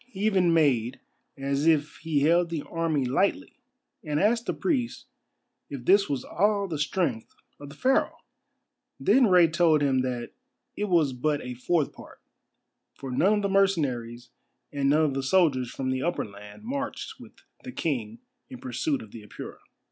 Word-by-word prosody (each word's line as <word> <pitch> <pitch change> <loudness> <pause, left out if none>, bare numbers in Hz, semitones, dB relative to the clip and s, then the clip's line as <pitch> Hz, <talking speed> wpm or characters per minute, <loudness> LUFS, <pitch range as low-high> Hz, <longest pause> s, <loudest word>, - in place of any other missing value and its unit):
He 205 -6 -9
even 185 -5 +3
made 135 -7 +2 0.4
as 140 +2 -1
if 150 -2 +2
he 155 -3 -1
held 170 +3 +3
the 160 -3 -3
army 165 -5 -1
lightly, 195 - -1 0.4
and 150 -1 -1
asked 230 +5 +1
the - - +1
priest 260 -9 -2 0.6
if 135 -4 -7
this 200 -1 +4
was 135 -3 -2
all 200 +1 +1
the 160 -5 -4
strength 150 - -2 0.2
of 145 -1 -10
Pharaoh! 260 - +1 0.8
Then 260 -3 +4
Rei 180 -3 +6
told 160 -2 +3
him 135 -2 +2
that 125 -2 -4 0.4
it 210 - -2
was 165 -8 +2
but 145 +4 -1
a 125 - -5
fourth 145 +5 0
part, - - -14 0.8
for 135 -2 -7
none 185 +11 +3
of 210 - +1
the 200 - 0
mercenaries 135 -12 0 0.4
and 140 -1 +1
none 155 +2 +4
of 145 - -1
the 135 - -2
soldiers 135 -4 +2
from 130 +1 -3
the 130 0 -1
Upper 175 +4 -1
Land 105 - -13
marched 275 +4 -5
with - - -13 0.3
the 255 - -7
King 115 - -3 0.3
in 130 - -8
pursuit 130 +3 -2
of 105 - -15
the 115 - -10
Apura. 105 - -10
150 Hz, 170 wpm, -26 LUFS, 130-190 Hz, 0.8 s, Rei